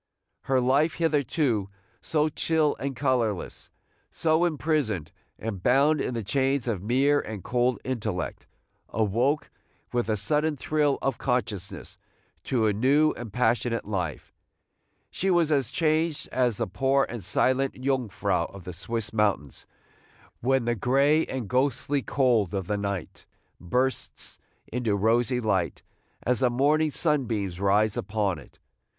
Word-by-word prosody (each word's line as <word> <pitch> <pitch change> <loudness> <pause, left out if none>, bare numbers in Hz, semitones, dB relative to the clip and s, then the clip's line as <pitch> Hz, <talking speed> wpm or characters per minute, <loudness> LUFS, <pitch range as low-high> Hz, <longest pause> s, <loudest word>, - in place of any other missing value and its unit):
Her 135 -1 +2
life, 135 +6 +2
hitherto 145 - +1 0.3
so 155 -1 +1
chill 155 0 +1
and 135 0 -3
colorless, 120 -7 -1 0.4
so 160 +1 +2
imprisoned 145 - -1 0.3
and 105 -4 -5
bound 140 +7 +3
in 125 - -2
the 115 - -2
chains 135 +3 0
of 105 -6 -1
mere 135 +7 +3
and 105 -5 -6
cold 125 0 +1
intellect, 110 -9 -3 0.4
awoke 120 +7 0 0.4
with 120 -2 0
a 110 - +1
sudden 150 +8 0
thrill 145 0 +1
of 135 -3 -1
consciousness 105 -7 -3 0.5
to 120 -4 +1
a 105 - +3
new 140 +8 +3
and 115 -3 -8
passionate 120 0 0
life. 90 -8 -4 0.8
She 195 - -1
was 170 -4 +3
as 140 -5 +2
changed 155 -1 0
as 125 -4 +1
the - - 0
poor 135 +7 +1
and 120 -4 -6
silent 130 +8 +1
Jungfrau 130 -6 0
of 100 -2 -11
the 90 - -7
Swiss 110 +4 -4
mountains, 100 -11 0 0.7
when 130 0 +1
the 120 - +1
gray 140 +8 +2
and 130 -5 -4
ghostly 135 +3 +1
cold 120 -9 +1
of 95 -2 -2
the 105 +3 -1
night 100 -3 -4 0.3
bursts 125 +9 -2 0.3
into 115 -4 -1
rosy 115 +4 +2
light, 105 -5 -1 0.4
as 125 -1 +1
the 130 -2 +3
morning 150 +5 +2
sunbeams 115 - 0
rise 100 +2 +2
upon 100 -1 -1
it. - - -17
125 Hz, 135 wpm, -26 LUFS, 105-140 Hz, 0.8 s, bound